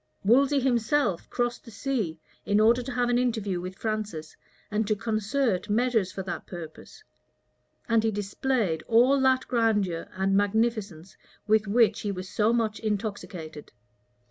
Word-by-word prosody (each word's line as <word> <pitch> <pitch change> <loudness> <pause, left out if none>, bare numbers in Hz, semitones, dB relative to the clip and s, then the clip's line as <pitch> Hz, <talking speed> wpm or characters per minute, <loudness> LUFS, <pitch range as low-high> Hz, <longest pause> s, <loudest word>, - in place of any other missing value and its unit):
Wolsey 275 +7 +4
himself 240 - +1
crossed 240 -1 -2
the - - -12
sea, 210 - -3 0.2
in 205 +1 +2
order 230 +3 +4
to 255 +3 -6
have 245 -1 0
an 245 0 +3
interview 215 -7 -1
with 185 +1 -6
Francis 210 -8 -4 0.4
and 210 0 0
to 215 - +2
concert 215 0 -1
measures 225 -3 +1
for 190 - -5
that 190 - -6
purpose; 175 - -10 0.8
and 230 -1 +3
he 225 - +2
displayed 205 -3 -1
all 245 +4 +4
that 260 -1 +2
grandeur 210 -8 0
and 190 +1 0
magnificence 205 -4 0 0.3
with 215 0 +2
which 225 +2 +3
he 205 - -2
was 185 -1 -6
so 210 +2 +1
much 225 -2 0
intoxicated. 200 -7 -5
215 Hz, 145 wpm, -27 LUFS, 195-240 Hz, 0.8 s, Wolsey